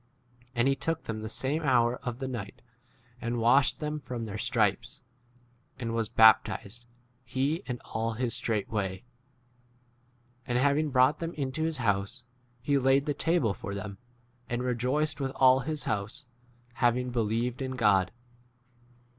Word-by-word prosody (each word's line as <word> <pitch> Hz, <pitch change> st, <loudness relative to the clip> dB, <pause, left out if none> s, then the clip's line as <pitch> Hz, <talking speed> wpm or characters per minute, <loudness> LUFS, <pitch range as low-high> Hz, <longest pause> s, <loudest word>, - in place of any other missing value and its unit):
And 120 Hz, +2 st, +2 dB
he 135 Hz, -, +3 dB
took 160 Hz, +5 st, -2 dB
them 110 Hz, -1 st, -4 dB
the 110 Hz, -, -5 dB
same 140 Hz, +7 st, -1 dB
hour 125 Hz, -4 st, +3 dB
of 120 Hz, -1 st, -5 dB
the 135 Hz, 0 st, -4 dB
night 115 Hz, -6 st, -6 dB, 0.6 s
and 120 Hz, 0 st, -2 dB
washed 130 Hz, +4 st, +4 dB
[them] 150 Hz, 0 st, -3 dB
from 125 Hz, -4 st, -5 dB
their 105 Hz, 0 st, -6 dB
stripes; 120 Hz, 0 st, 0 dB, 0.8 s
and 115 Hz, -3 st, -3 dB
was 115 Hz, -2 st, -1 dB
baptized, 110 Hz, 0 st, +4 dB, 0.4 s
he 135 Hz, +5 st, 0 dB
and 125 Hz, -1 st, -3 dB
34 -, -, -19 dB
all 115 Hz, +1 st, -1 dB
his 120 Hz, +1 st, -2 dB
straightway. 100 Hz, -3 st, -2 dB, 1.4 s
And 120 Hz, -, 0 dB
having 145 Hz, +4 st, +2 dB
brought 130 Hz, +2 st, +4 dB
them 165 Hz, 0 st, -4 dB
into 135 Hz, +1 st, -3 dB
his 160 Hz, -1 st, -1 dB
house 110 Hz, +1 st, -1 dB, 0.4 s
he 140 Hz, -1 st, +2 dB
laid 135 Hz, +2 st, +3 dB
the 145 Hz, -, 0 dB
table 160 Hz, -, +1 dB
[for 100 Hz, 0 st, -6 dB
them], 100 Hz, 0 st, -6 dB, 0.5 s
and 120 Hz, 0 st, -2 dB
re 125 Hz, 0 st, 0 dB
joiced 140 Hz, +5 st, -1 dB
with 135 Hz, -1 st, -2 dB
all 130 Hz, 0 st, +6 dB
his 150 Hz, +3 st, -2 dB
house,* 110 Hz, +8 st, -3 dB, 0.5 s
having 125 Hz, +1 st, +1 dB
35 -, -, -8 dB
believed 115 Hz, +2 st, -1 dB
in 130 Hz, 0 st, -2 dB
God. 100 Hz, -6 st, +3 dB
125 Hz, 155 wpm, -29 LUFS, 115-135 Hz, 1.4 s, all